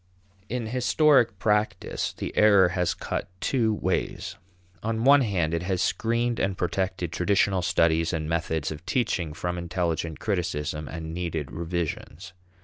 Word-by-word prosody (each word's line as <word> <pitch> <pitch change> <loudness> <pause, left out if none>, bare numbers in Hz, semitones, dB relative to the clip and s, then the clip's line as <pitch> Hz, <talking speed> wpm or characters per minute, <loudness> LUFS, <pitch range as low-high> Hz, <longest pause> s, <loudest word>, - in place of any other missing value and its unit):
In 125 -1 -2
historic 125 0 +3
practice 105 +1 0
the - - -6
error 100 -4 +6
has 90 -1 0
cut - - -4
two 115 -1 +1
ways. - - -2 0.5
On 110 +1 -1
one 140 +2 +7
hand, 90 -9 0
it 85 - 0
has 90 0 -1
screened 115 +4 0
and 95 -1 0
protected 90 -1 -2
traditional 95 +2 +2
studies 85 -1 +2
and 80 -3 -2
methods 80 -2 -1
of 80 +1 -7
teaching 95 -10 0
from 90 +3 -3
intelligent 85 -2 -2
criticism 80 -6 -2
and 80 +3 -6
needed 80 -5 -3
revisions. 85 +1 -4
90 Hz, 140 wpm, -26 LUFS, 80-105 Hz, 0.5 s, one